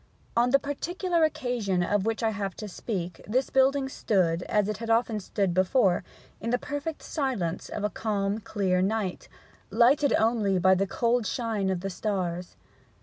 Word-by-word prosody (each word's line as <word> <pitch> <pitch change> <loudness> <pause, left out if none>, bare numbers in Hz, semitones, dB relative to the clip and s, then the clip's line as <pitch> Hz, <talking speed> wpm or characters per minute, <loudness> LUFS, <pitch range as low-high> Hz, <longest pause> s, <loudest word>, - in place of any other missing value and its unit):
On 240 +1 +3
the 275 - +6
particular 340 +5 -1
occasion 240 - 0
of 205 +3 0
which 225 +1 -1
I 220 - +2
have 200 -3 -4
to 215 - -6
speak 180 -3 -5
this 255 +5 0
building 270 +1 +3
stood, 180 -9 +1
as 210 -1 +2
it 215 -2 -2
had 230 +1 -6
often 225 -1 +2
stood 195 -1 -1
before, 185 0 +3 0.4
in 230 - -4
the 245 - +2
perfect 290 +4 -5
silence 235 - -2
of - - -4
a 210 - +1
calm 205 -1 -1
clear 195 -4 0
night, 200 -1 -2 0.4
lighted 250 +7 +4
only 220 -4 +2
by 185 +1 +5
the 195 +1 +1
cold 235 +2 +1
shine 220 -5 -1
of 185 -2 -1
the 195 +1 -3
stars. 180 -3 -3
215 Hz, 170 wpm, -27 LUFS, 190-245 Hz, 0.4 s, the